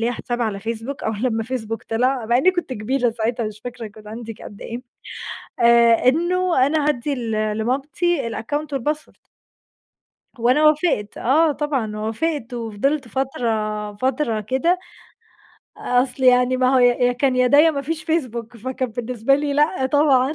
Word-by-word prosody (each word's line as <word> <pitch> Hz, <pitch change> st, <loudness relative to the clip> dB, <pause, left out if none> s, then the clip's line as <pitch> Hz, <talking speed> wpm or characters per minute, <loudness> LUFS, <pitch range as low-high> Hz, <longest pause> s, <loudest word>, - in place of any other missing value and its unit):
ليّا 235 Hz, +2 st, 0 dB
حساب 240 Hz, 0 st, -3 dB
على 205 Hz, -3 st, -2 dB
فيسبوك 230 Hz, +5 st, -5 dB
أول 220 Hz, 0 st, -2 dB
لمّا 225 Hz, -3 st, 0 dB
فيسبوك 225 Hz, -2 st, -4 dB
طلع، 245 Hz, +1 st, 0 dB
مع 235 Hz, -, +3 dB
أنني 335 Hz, +9 st, +4 dB
كنت 350 Hz, -7 st, -3 dB
كبيرة 245 Hz, +2 st, 0 dB
ساعتها، 230 Hz, 0 st, -2 dB
مش 215 Hz, 0 st, -8 dB
فاكرة 240 Hz, -2 st, -6 dB
كان 210 Hz, 0 st, -13 dB
عندي 225 Hz, 0 st, -7 dB
قد 205 Hz, -, -11 dB
إيه 235 Hz, +2 st, -6 dB, 0.8 s
آآ 235 Hz, 0 st, +5 dB
إنه 345 Hz, -2 st, +2 dB
أنا 300 Hz, -1 st, +1 dB
هادّي 285 Hz, 0 st, 0 dB, 0.4 s
لمامتي 270 Hz, +5 st, -1 dB
الaccount 290 Hz, +8 st, -3 dB
والpassword 300 Hz, +4 st, -4 dB, 1.2 s
وأنا 250 Hz, +6 st, +3 dB
وافقت، 305 Hz, -, +1 dB
آه 305 Hz, +5 st, +3 dB
طبعًا 270 Hz, -8 st, -2 dB
وافقت 240 Hz, +4 st, -2 dB
وفضلت 240 Hz, +5 st, -2 dB
فترة 220 Hz, -5 st, -2 dB
فترة 245 Hz, -1 st, -1 dB
كده، 265 Hz, -, +1 dB, 1.0 s
أصل 250 Hz, +1 st, 0 dB
يعني 250 Hz, 0 st, +5 dB
ما 255 Hz, +1 st, +2 dB
هو -, -, +5 dB
ي 245 Hz, -, +5 dB
يا 245 Hz, 0 st, +3 dB
كان 255 Hz, +1 st, +1 dB
يا 255 Hz, 0 st, +4 dB
ده، 285 Hz, +4 st, +5 dB
يا 320 Hz, +2 st, +7 dB
ما 280 Hz, -2 st, -3 dB
فيش 315 Hz, +2 st, -4 dB
فيسبوك 240 Hz, -8 st, -2 dB
فكان 255 Hz, +2 st, -3 dB
بالنسبة 245 Hz, +2 st, 0 dB
لي 285 Hz, 0 st, -1 dB
لأ 295 Hz, -1 st, +2 dB
طبعًا 280 Hz, 0 st, +3 dB
250 Hz, 155 wpm, -21 LUFS, 230-285 Hz, 1.2 s, يا